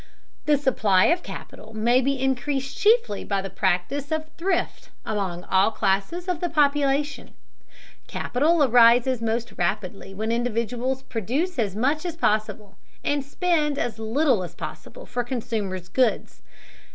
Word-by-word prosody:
The 295 -1 +5
supply 215 -9 +3
of 350 - -4
capital 220 - -10
may 240 +4 +3
be 275 +1 0
increased 265 +1 -1
chiefly 425 - +2
by 200 -1 -1
the 195 - -6
practice 195 - -1
of 315 0 -1
thrift 375 +3 -2 0.2
among 190 -5 -3
all 190 +2 +3
classes 215 - -1
of 360 -3 -1
the 350 - -1
population. 290 -1 +1 0.7
Capital 305 +5 +1
arises 245 0 +5
most 230 +1 -2
rapidly 195 +1 -3
when 220 +3 -2
individuals 240 +2 -1
produce 265 - -2
as 200 -4 0
much 280 +8 +1
as 345 -3 -4
possible, 215 -6 -1 0.2
and 290 -1 0
spend 300 0 0
as 230 -4 -2
little 235 +1 +2
as 175 - -8
possible - - -8
for 245 - -2
consumers' 220 -7 -4
goods. 240 +5 0
245 Hz, 140 wpm, -24 LUFS, 215-290 Hz, 0.7 s, The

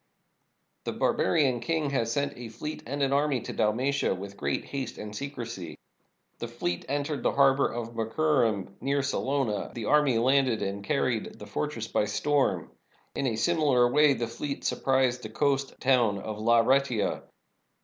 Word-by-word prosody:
The - - -2
bar - - +1
barian 125 +3 +2
king 150 +2 -1
has 115 -4 0
sent 140 +3 -1
a 120 -2 -8
fleet 150 +7 -6
and 140 +3 -2
an 135 0 +1
army 140 -2 +2
to - - -6
Dalmatia 125 +4 +1
with 100 +2 -8
great 70 -5 -2
haste 135 -2 -5
and 105 0 -7
secrecy. 120 - -6 0.6
The - - -4
fleet 85 0 -3
entered 145 +1 -2
the - - +1
har 135 -1 +5
bor 140 - +1
of 115 0 -5
Muicurum 115 -4 0
near 140 +1 0
Salona; 135 -5 -1
the 115 -3 -4
army 145 -3 +3
landed 130 -1 +2
and 100 +1 -3
carried 125 -4 -1
the 105 - -9
fortress 115 +2 -3
by - - +1
storm. 140 +7 0 0.4
In 135 - -1
a 115 - 0
similar 140 -2 +3
way 150 0 +5
the 120 - -2
fleet 140 +5 -5
surprised 130 -2 +1
the 110 - -7
coast 140 +3 0
town 120 -6 +3
of 105 +2 -6
Laureata. 120 +1 +2
130 Hz, 165 wpm, -28 LUFS, 110-140 Hz, 0.6 s, har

